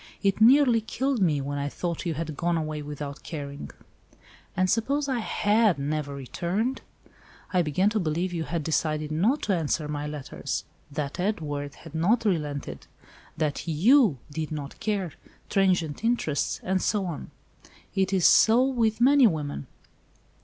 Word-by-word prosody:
It 195 +1 +1
nearly 245 -1 +6
killed 260 +2 -1
me, 155 -6 +2
when 145 +1 -3
I 140 0 -2
thought 175 +3 -4
you 165 - -1
had 155 0 -4
gone 170 +2 0
away 155 -1 -3
without 145 -1 -6
caring." 145 -3 -7 0.9
"And 185 0 +3
suppose 275 +9 +1
I 260 -3 0
had 215 -3 +2
never 145 0 -2
returned? 180 - -2 0.7
I 180 - +4
began 180 +6 +1
to 220 - 0
believe 175 +1 -1
you 165 -2 -2
had 170 -2 -3
decided 155 -1 -1
not 210 - +1
to 200 - +1
answer 155 -2 -1
my 150 0 -3
letters. 150 -2 -4 0.3
That 145 0 -4
Edward 150 -7 -2
had 160 - -13
not 210 +9 +2
relented. 145 - -2 0.5
That 155 0 -2
you 195 - +4
did 155 +1 -4
not 145 -2 -6
care—transient 190 -3 -1
interest, 225 -11 0
and 185 0 0
so 205 -3 0
on. 170 -5 -5 0.6
It 195 0 +1
is 190 -3 +2
so 230 +3 +6
with 235 -4 +1
many 270 0 +7
women." 145 - -3
170 Hz, 150 wpm, -26 LUFS, 150-215 Hz, 0.9 s, many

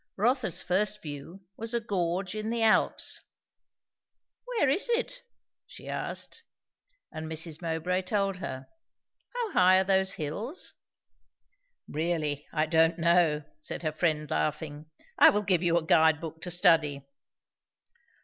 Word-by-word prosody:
Rotha's 235 - +1
first 210 +3 0
view 160 +6 -8
was 225 +1 -3
a - - +2
gorge 185 -3 -2
in 215 0 -4
the 230 0 0
Alps. 220 -1 +2 1.2
"Where 485 - +1
is 325 - +1
it?" - - -1 0.5
she - - -12
asked. 455 - -4 0.7
And 160 0 -6
Mrs. 160 0 -4
Mowbray 170 +2 -1
told 195 0 -1
her. 130 -7 -6 0.7
"How 475 -4 -2
high 185 - +5
are - - +3
those 190 0 +2
hills?" 205 - -5 1.1
"Really, 155 -2 -2
I 155 -1 +1
don't 165 +1 +3
know," 170 -3 +3 0.2
said 155 - -6
her 155 - 0
friend 155 -1 0
laughing. 150 -1 -2 0.3
"I - - +9
will 210 +1 +1
give 180 -4 +2
you 170 -1 +2
a 165 - -1
guide 160 -1 +4
book 160 -1 -8
to 180 - -3
study." 160 -5 +3
175 Hz, 135 wpm, -28 LUFS, 160-205 Hz, 1.2 s, I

